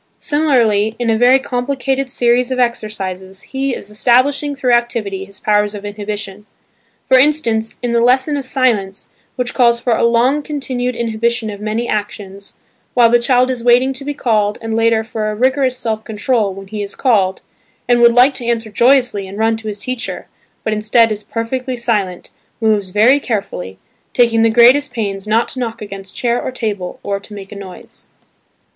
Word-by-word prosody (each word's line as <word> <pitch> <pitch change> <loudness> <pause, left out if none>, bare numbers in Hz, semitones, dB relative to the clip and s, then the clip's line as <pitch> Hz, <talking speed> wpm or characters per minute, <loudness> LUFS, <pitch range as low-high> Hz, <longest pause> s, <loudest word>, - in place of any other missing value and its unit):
Similarly, 230 -8 +1
in 240 -2 0
a - - +2
very 245 +3 +5
complicated 265 +1 -2
series 245 0 +2
of 260 - -2
exercises 195 -5 -3
he 270 -1 -3
is 205 - -7
establishing 270 +6 +2
through 260 -2 0
activity 225 -5 0
his 200 +1 -15
powers 210 0 +1
of 205 0 -8
inhibition; 205 0 -6 0.6
for 260 - +5
instance 235 -6 +1
in 240 -1 -1
the 235 - +3
"lesson 260 +5 +2
of 280 - -3
silence," 230 -8 -1 0.3
which 250 -2 -3
calls 235 -2 +3
for 235 -1 +1
a - - 0
long 240 +5 +3
con 295 0 -5
tinued 250 -2 -3
inhibition 230 -1 -1
of 205 0 -9
many 220 +3 -2
actions, 200 -1 -5 0.4
while 235 -2 +5
the 240 - +5
child 250 +1 +2
is 245 -2 -5
waiting 250 +2 +4
to 265 +1 -7
be 290 +1 -4
called 210 -6 0
and 225 -1 -4
later 225 -1 +2
for 220 -1 -3
a 210 - -3
rigorous 260 +2 +1
self 220 -3 -3
control 220 -1 -1
when 195 +1 -9
he 210 +2 -6
is 200 -1 -6
called 200 -8 +1 0.4
and 240 -1 +3
would 235 0 +7
like 255 +3 +5
to 245 - -6
answer 230 -2 -1
joyously 245 -3 +2
and 195 +2 -9
run 225 +1 +2
to 220 0 -8
his 210 -1 -4
teacher, 255 +3 -4 0.4
but 220 - -1
instead 215 +2 +3
is 210 -1 -3
perfectly 250 +4 -4
silent, 210 -7 -2 0.3
moves 215 -4 +1
very 225 +9 +4
carefully, 195 - -4 0.4
taking 235 -2 +3
the 225 - +4
greatest 245 +6 +5
pains 200 -3 -4
not 225 +2 +2
to 260 - -6
knock 230 -2 -4
against 195 -2 -9
chair 240 0 0
or - - -4
table 210 -7 -4
or 200 -1 -2
to 205 +1 -12
make 195 -1 -10
a - - -8
noise. 195 -2 -11
230 Hz, 185 wpm, -16 LUFS, 210-250 Hz, 0.6 s, would